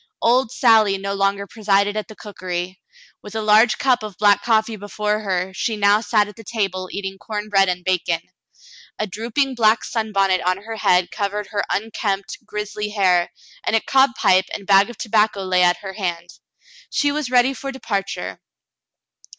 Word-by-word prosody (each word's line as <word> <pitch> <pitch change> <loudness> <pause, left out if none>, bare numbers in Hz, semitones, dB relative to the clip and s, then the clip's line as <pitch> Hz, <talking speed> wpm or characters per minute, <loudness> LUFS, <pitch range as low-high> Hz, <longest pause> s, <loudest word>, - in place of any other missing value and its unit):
Old 240 0 +2
Sally 220 -6 +4
no 200 +1 -4
longer 200 0 0
presided 200 0 +1
at 215 - -3
the 215 - -12
cookery. 185 -3 -6 0.4
With 210 +1 -11
a 220 - -1
large 215 +2 +5
cup 255 -3 +2
of 210 -4 -8
black 205 -1 +4
coffee 220 -1 +1
before 210 +1 -2
her, 190 -2 -2
she 220 +3 -2
now 205 +1 +4
sat 215 -3 +2
at 210 - -12
the 225 - -12
table 195 -4 -3
eating 195 -1 -5
corn 210 -1 -5
bread 195 -2 +3
and 180 0 -3
bacon. 175 -2 0 0.8
A 215 - -1
drooping 235 +7 -2
black 225 -2 +3
sunbonnet 195 -5 0
on 185 +1 0
her 225 0 -6
head 180 -3 +2
covered 205 +1 -3
her 205 -2 -1
unkempt, 200 -2 -3
grizzly 210 0 -5
hair, 185 -4 +2 0.3
and - - 0
a - - +4
cob 265 +2 +2
pipe 185 0 +4
and 200 - -7
bag 195 +2 +5
of 240 - -10
tobacco 215 -3 +1
lay 185 -1 +2
at 175 0 +4
her 190 -1 -6
hand. 175 -3 -4 0.6
She 290 0 +1
was 295 -3 -3
ready 250 +1 +3
for 275 0 -6
departure. 200 - -4
205 Hz, 175 wpm, -21 LUFS, 190-220 Hz, 0.8 s, large